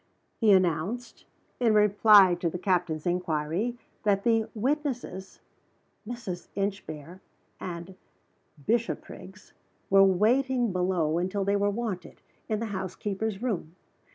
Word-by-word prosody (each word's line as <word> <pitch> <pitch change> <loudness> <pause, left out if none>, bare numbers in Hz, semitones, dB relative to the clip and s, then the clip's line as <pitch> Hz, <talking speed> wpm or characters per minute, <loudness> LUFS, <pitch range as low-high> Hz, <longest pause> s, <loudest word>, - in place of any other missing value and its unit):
He 220 -4 +5
announced, 185 +5 0 0.3
in 230 -3 +3
reply 210 -2 +6
to 170 - 0
the 180 - -5
captain's 175 -4 0
inquiry, 175 +5 -1 0.2
that 200 -2 +1
the 225 -2 +2
witnesses 245 -6 -3 0.7
(Mrs. 225 -7 -6
Inchbare 190 -4 -4 0.4
and 175 +1 -6 0.7
Bishopriggs) 210 -4 -3 0.4
were 195 0 +7
waiting 240 +5 +2
below 180 -3 +1
until 190 +3 -1
they 200 +1 +1
were 205 0 +2
wanted, 205 -3 -4 0.3
in 215 -1 0
the 230 - -2
housekeeper's 195 +3 -3
room. 180 -9 -3
195 Hz, 110 wpm, -28 LUFS, 180-220 Hz, 0.7 s, were